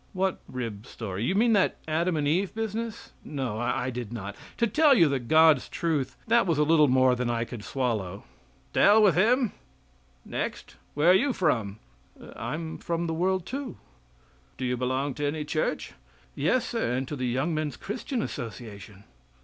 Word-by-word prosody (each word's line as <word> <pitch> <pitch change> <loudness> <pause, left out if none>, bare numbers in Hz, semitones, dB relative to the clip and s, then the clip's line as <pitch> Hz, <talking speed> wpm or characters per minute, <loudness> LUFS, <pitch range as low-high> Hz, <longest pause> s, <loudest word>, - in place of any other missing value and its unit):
"What 190 -1 0
rib 115 -4 -6
story 100 -4 -6
Do 115 - 0
you 190 - +1
mean 230 +2 +4
that 200 -3 +2
Adam 165 +2 0
and 145 -1 0
Eve 185 +7 0
business? 225 +1 -4
No, 130 -7 -4
I 125 +1 -1
did 120 -3 -6
not. 100 -4 -6 0.2
To 235 - +3
tell 285 +5 +5
you 170 - +6
the 140 -2 0
God's 155 +3 +4
truth, 155 -6 -2
that 230 -3 +3
was 165 -4 +1
a 150 - +4
little 155 -1 +5
more 130 0 +4
than 125 -1 -1
I 115 -1 0
could 115 -3 -8
swallow." 105 -6 -2 0.5
"To - - 0
hell 215 +2 +7
with 195 -4 +6
him. 230 - +3 0.7
Next. - - -5 0.2
Where 155 +5 +5
are - - +7
you 265 +8 +3
from?" 115 - 0 0.6
"I'm 160 +1 -5
from 170 0 -2
the 165 - -2
world, 185 +2 0
too. 270 +2 -5 0.8
Do 130 - -3
you 125 0 0
belong 130 +3 -1
to 145 +2 -2
any 150 +1 -2
church?" 155 +1 -2 0.4
"Yes, 200 - +1
sir, 230 - -1
and 130 +1 -2
to 150 - -4
the 130 -2 -2
Young 135 +7 0
Men's 155 -1 -2
Christian 235 +3 -3
Association." 105 -5 -8
150 Hz, 180 wpm, -27 LUFS, 125-190 Hz, 0.8 s, hell